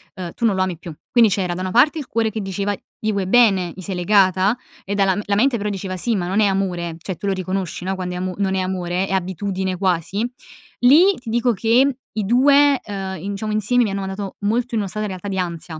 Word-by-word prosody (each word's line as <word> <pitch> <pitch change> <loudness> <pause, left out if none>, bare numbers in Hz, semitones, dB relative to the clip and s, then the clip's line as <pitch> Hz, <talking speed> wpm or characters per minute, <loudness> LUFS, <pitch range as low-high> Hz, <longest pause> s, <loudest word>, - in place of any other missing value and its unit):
ehm: 180 -3 -6
"Tu 235 - -2
non 210 -4 +3
lo 190 - +2
ami 185 -2 -2
più". 175 - -8 0.2
Quindi 235 -3 +5
c'era 185 -2 -1
da 180 - -5
una 185 - -2
parte 275 - +4
il 285 - -7
cuore 225 -1 0
che 220 - -4
diceva: 200 +1 -2 0.2
"Gli 215 - -1
vuoi 200 -2 -2
bene, 195 -5 +4
gli 185 - -9
sei 190 +1 -5
legata" 190 +3 +3 0.3
e 200 - -3
dal 195 0 +2
la 200 - 0
mente 245 +4 +3
però 210 -1 -2
diceva: 190 -2 -4
"Sì 225 +5 0
ma 180 -3 -1
non 190 +4 0
è 210 - +4
amore", 180 -4 -1
cioè 170 +1 -6
tu 200 - -5
lo 195 - +2
riconosci, 185 -1 -3
no, 190 +1 -1
quando 180 -1 -4
è - - -4
amo 185 0 -3
non 195 -1 0
è - - 0
amore, 185 0 -2
è 195 - -7
abitudine 190 0 -2
quasi, 190 +4 0 0.5
lì 315 +11 +6
ti 240 -2 -9
dico 240 +1 +2
che 240 +6 +2
i 215 -2 -3
2 280 +4 +5
ehm, 190 -4 -5
in 200 +1 -4
diciamo 215 +2 -4
insieme 215 +4 +2
mi 210 - -1
hanno 200 - -3
mandato 195 0 -5
molto 235 +4 -1
in 225 - +1
una 200 - -4
strada 215 +3 -3
realtà 190 -1 -6
di 195 -1 -3
ansia. 170 -3 -4
195 Hz, 250 wpm, -20 LUFS, 185-220 Hz, 0.5 s, lì